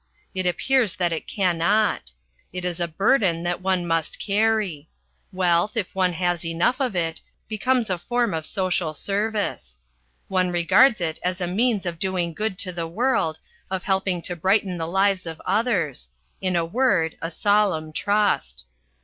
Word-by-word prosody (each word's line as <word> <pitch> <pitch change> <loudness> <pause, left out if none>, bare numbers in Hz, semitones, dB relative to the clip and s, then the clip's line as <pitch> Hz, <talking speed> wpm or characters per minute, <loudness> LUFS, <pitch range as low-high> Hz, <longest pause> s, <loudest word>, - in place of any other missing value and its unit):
It 185 -1 -1
appears 240 +3 +2
that 175 -2 0
it 160 - -5
cannot. 185 - +1 0.4
It 180 0 -5
is 175 -1 -2
a 170 - 0
burden 175 0 +2
that 175 +1 -2
one 185 -2 0
must 165 -2 -1
carry. 205 -7 0 0.4
Wealth, 185 +4 +1
if 200 -5 -2
one 185 -2 +1
has 175 0 -1
enough 170 +9 +1
of 250 -7 0
it, 165 -2 -1 0.3
becomes 230 +2 +1
a 185 -2 -2
form 240 +4 0
of 160 -1 -3
social 185 -5 -1
service. 200 - -2 0.5
One 185 -1 +1
regards 185 +7 +4
it 160 -2 -2
as 180 +1 -2
a 180 - -1
means 210 +3 +1
of 170 -2 -4
doing 185 -3 -1
good 210 +1 -2
to 185 - -4
the 170 -1 -3
world, 175 -4 0 0.3
of 190 -1 -3
helping 190 -3 0
to 175 - -2
brighten 190 +1 +1
the 160 - -2
lives 190 0 +1
of 160 -1 -6
others 170 - 0 0.3
in 185 -1 0
a 170 -1 +2
word, 170 -5 +1
a 165 - -2
solemn 185 -5 +1
trust. 180 - 0
185 Hz, 165 wpm, -24 LUFS, 170-205 Hz, 0.5 s, regards